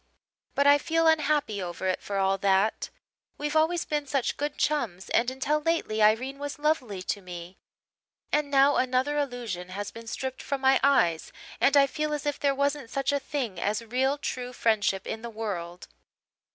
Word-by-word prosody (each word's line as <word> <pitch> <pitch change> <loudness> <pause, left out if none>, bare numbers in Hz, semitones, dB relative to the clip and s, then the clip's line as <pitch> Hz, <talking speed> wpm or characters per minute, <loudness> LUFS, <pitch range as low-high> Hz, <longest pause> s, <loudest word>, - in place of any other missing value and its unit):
But 280 - +2
I 285 0 +7
feel 330 +2 +1
unhappy 300 -9 +2
over 175 +1 -5
it 185 - 0
for 200 - -4
all 195 0 +1
that. 195 +2 +1 0.5
We've 295 +1 -3
always 320 +2 +2
been 295 -1 -2
such 270 -2 0
good 290 0 -3
chums 230 -12 -1
and 235 +2 +3
until 285 +4 -1
lately 300 -9 0
Irene 245 +6 +3
was 290 0 -5
lovely 265 -11 -1
to 200 +1 -3
me; 175 0 -9 0.7
and 300 -1 +1
now 280 +1 +4
another 260 +3 +1
illusion 235 -10 -4
has 200 +2 -5
been 230 0 -11
stripped 260 +3 -4
from 280 - -3
my 265 0 +4
eyes 175 - +3 0.3
and 280 +1 +4
I 280 - +7
feel 300 +2 -2
as 295 - -6
if 290 -1 -1
there 280 -1 +1
wasn't 280 -2 -1
such 275 +2 -1
a 285 - +1
thing 265 -9 -4
as 210 +4 -1
real 260 +5 +1
true 250 -3 -4
friendship 210 -5 +1
in 220 - -5
the 235 - -6
world. 185 -6 -5
260 Hz, 180 wpm, -27 LUFS, 205-290 Hz, 0.7 s, I